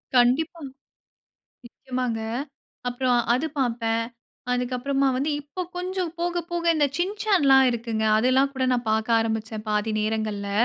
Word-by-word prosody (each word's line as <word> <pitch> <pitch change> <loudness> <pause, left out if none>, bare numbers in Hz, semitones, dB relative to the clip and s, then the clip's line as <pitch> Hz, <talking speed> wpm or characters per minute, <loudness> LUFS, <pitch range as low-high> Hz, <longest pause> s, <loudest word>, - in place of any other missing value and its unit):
கண்டிப்பா, 260 +7 +3 1.0
நிச்சயமாங்க. 250 -1 -3 0.7
அப்புறம் 245 0 +1
அது 265 +6 0
பார்ப்பேன். 230 -2 0 0.5
அதுக்கு 250 0 -1
அப்புறமா 275 +2 +1
வந்து 285 +4 0
இப்போ 290 +5 -6 0.2
கொஞ்சம் 365 -1 -2
போக 345 0 0
போக 345 0 -1
இந்த 295 -2 +3
"சின்சான்லாம்" 355 -8 +4
இருக்குங்க. 230 -2 -2
அதெல்லாம் 260 +4 +3
கூட 260 - -1
நான் 240 -2 -2
பார்க்க 220 +1 +2
ஆரம்பிச்சேன் 220 -1 -3
பாதி 210 +1 0
நேரங்கள்ல. 215 -2 -2
250 Hz, 125 wpm, -25 LUFS, 225-290 Hz, 1.0 s, சின்சான்லாம்